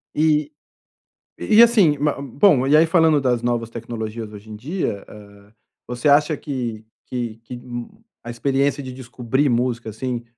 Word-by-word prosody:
E 150 -1 +2 0.9
e 215 - 0
e 230 - +10
assim, 205 -11 +4
ma 145 -1 -1
bom, 140 - +3
e 150 - +5
aí 160 - +6
falando 160 -2 +3
das 125 -3 0
novas 120 -1 -1
tecnologias 115 -1 -6
hoje 105 +1 -12
em 105 - -7
dia, 125 - -4
ah, 100 -1 -15 0.4
você 125 +3 -2
acha 150 +1 +4
que 120 -6 -5 0.2
que 120 -3 -4
que, 125 - -8
hum, 120 -1 -7 0.3
a 120 - -8
experiência 140 +4 0
de 130 -1 -7
descobrir 130 +2 -2
música, 120 -1 -1
assim, 120 +2 -4
125 Hz, 160 wpm, -21 LUFS, 115-145 Hz, 0.9 s, e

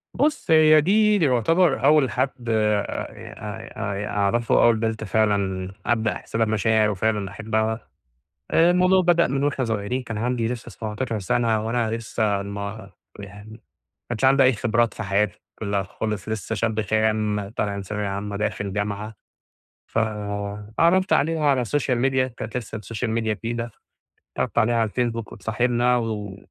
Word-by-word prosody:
بُص 290 - 0
هي 155 -1 +7
دي 210 +4 +4
دي 165 - +2
يعتبر 140 +6 +2
أول 150 -4 +5
حد 125 -2 -2
آآ 105 -2 0
ي - - -11 0.5
آآ 100 +1 -3
أعرَفه 105 +3 +2
أول 115 -1 +5
بنت 110 0 -2
فعلًا 100 -2 0
أبدأ 110 -2 +1
أحس - - -10
لها 115 0 +3
بمشاعر 110 0 +2
وفعلًا 105 -1 -1
أحبها، 110 0 -2 0.6
آآ 170 +2 +5
الموضوع 185 +1 +4
بدأ 170 -1 +4
من 135 +2 -1
وإحنا 140 -3 0
صغيرين 115 +3 -2
كان 115 -3 -5
عندي 120 -1 0
لسه 120 -1 -5
17 110 +1 -4
سنة، 110 +3 0
وأنا 115 -1 0
لسه 110 -3 -1
ما 100 0 -6 0.3
يعني 100 +2 -10
ما 110 - -13 0.5
كانش 120 +2 0
عندي 135 0 +5
أي 130 - +5
خبرات 115 0 +1
في 115 - -5
حياتي 100 +1 0 0.2
كلها 100 -2 -1
خالص، 105 +2 -4
لسه 110 +1 -3
شاب 110 +1 0
خام 110 -1 0
طالع 100 -2 -2
من 100 - -4
ثانوية 105 +1 -3
عامة 100 +1 -4
داخل 100 -2 -2
جامعة، 105 +1 -3 0.8
ف - - 0
اتعرّفت 105 - 0
عليها 160 +1 +2
على 135 -3 +3
السوشيال 125 0 0
ميديا 130 0 +2
كانت 115 -1 -7
لسه 110 -2 -5
السوشيال 110 +3 -4
ميديا 110 -1 0
جديدة، 115 +1 -4 0.7
اتعرّفت - - -2
عليها 120 +2 +3
على 110 -2 +1
الفيسبوك 115 -1 -2
واتصاحبنا 120 +2 +1
و 115 - -1
و 100 -2 -6
110 Hz, 160 wpm, -23 LUFS, 105-125 Hz, 0.8 s, هي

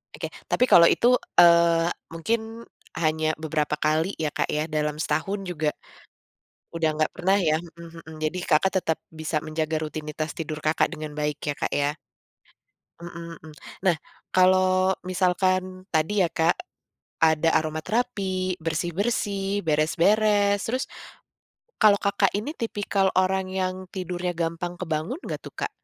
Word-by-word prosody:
Oke - - -4 0.2
tapi 250 - +3
kalau 170 -8 +7
itu, 245 +1 +4 0.3
eee, 170 -1 +6 0.2
mungkin, 225 +6 -3 0.3
hanya 155 -1 0
beberapa 150 -1 -1
kali 160 +5 0
ya 155 -2 -2
Kak 150 -2 -1
ya 150 +1 0
dalam 150 -1 -2
setahun 195 +5 -2
juga. 155 -4 -1 1.1
Udah 160 -2 +1
nggak 155 - +2
pernah 190 +3 +2
ya, 155 -4 +2
mhm 170 0 -12
mhm 160 - -11
jadi 155 +4 -2
Kakak 170 +4 +3
tetap 160 -2 0
bisa 155 -1 -3
menjaga 155 0 -2
rutinitas 155 0 -5
tidur 155 -1 -4
Kakak 155 +3 +1
dengan 155 -2 -7
baik 150 0 -2
ya 145 - +1
Kak - - -3
ya. 145 +2 0 1.0
Mhm 170 -1 -9
mhm, 155 -1 -13 0.3
nah 185 -3 +2 0.4
kalau 185 0 +4 0.2
misalkan 185 0 0
tadi 160 +6 +1
ya - - +2
Kak. 165 +1 +2 0.7
Ada 160 0 +4
aromaterapi, 185 +3 -1
bersih-bersih, 195 +4 -1
beres-beres, 200 +6 +3
terus, 255 +4 -2 0.9
kalau 205 -2 +5
Kakak 200 -1 +2
ini 235 +11 -3
tipikal 200 -4 0
orang 190 0 +2
yang 185 0 -3
tidurnya 180 -1 -3
gampang 170 +1 -3
kebangun 175 - -3
nggak - - -4
tuh - - -12
Kak? - - -3
170 Hz, 135 wpm, -25 LUFS, 155-190 Hz, 1.1 s, kalau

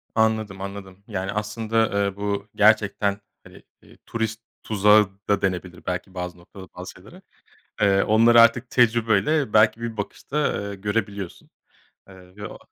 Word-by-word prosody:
Anladım, 110 -3 0
anladım. 100 -1 -8
Yani, 95 -3 -3
aslında, 105 0 -1
eee, 100 -1 -3
bu 100 0 -3
gerçekten, 100 -1 +2 0.2
hani, - - -16 0.2
eee, - - -20
"turist 110 -1 -3 0.2
tuzağı" 105 -1 +4 0.2
da 100 - +2
denebilir 90 -2 -3
belki 90 +1 -4
bazı 90 -1 -6
noktada 95 +2 -13
bazı - - -8
şeylere. - - -16 0.6
Eee, 100 -1 +3
onları 115 +2 +5
artık 115 +2 +4
tecrübeyle, 120 +2 +2
belki, 110 +1 +4
bir 115 -1 -5
bakışta, 140 +6 -3
eee, - - -6
görebiliyorsun, 100 -2 -4 0.6
eee, 95 -1 -16
ve 105 0 -7
o - - -11
105 Hz, 140 wpm, -23 LUFS, 95-110 Hz, 0.6 s, onları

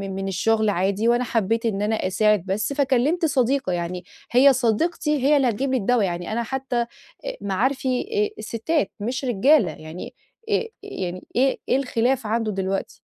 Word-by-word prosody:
من 195 0 -3
الشغل 215 +3 +1
عادي، 200 +3 0
وأنا 240 +1 +3
حبّيت 225 0 0
إن 205 -3 0
أنا 215 +1 +1
أساعد 210 0 +2
بس، 205 +7 -1
فكلّمت 280 +5 +2
صديقة 265 - +1
يعني. 175 +1 -3 0.3
هي 270 +3 +6
صديقتي 285 +6 +1
هي 290 +2 +5
اللي 260 -3 +3
هتجيب 260 +5 -1
لي 260 - +2
الدّوا. 240 0 +2
يعني 175 0 -3
أنا 235 +1 -1
حتّى 265 0 -2 0.4
أ - - -4
معارفي 255 +6 0
آآ 420 0 -1
السِّتات، 260 +9 -1
مش 255 +6 -3
رجالة. 245 - +4
يعني 160 - -9 0.4
آآ، 440 +2 +1 0.2
يعني 185 - -5
إيه 265 +2 +2
إيه 255 - +4
الخلاف 250 -1 0
عنده 225 0 0
دلوقتي؟ 195 0 -3
235 Hz, 165 wpm, -23 LUFS, 200-270 Hz, 0.4 s, هي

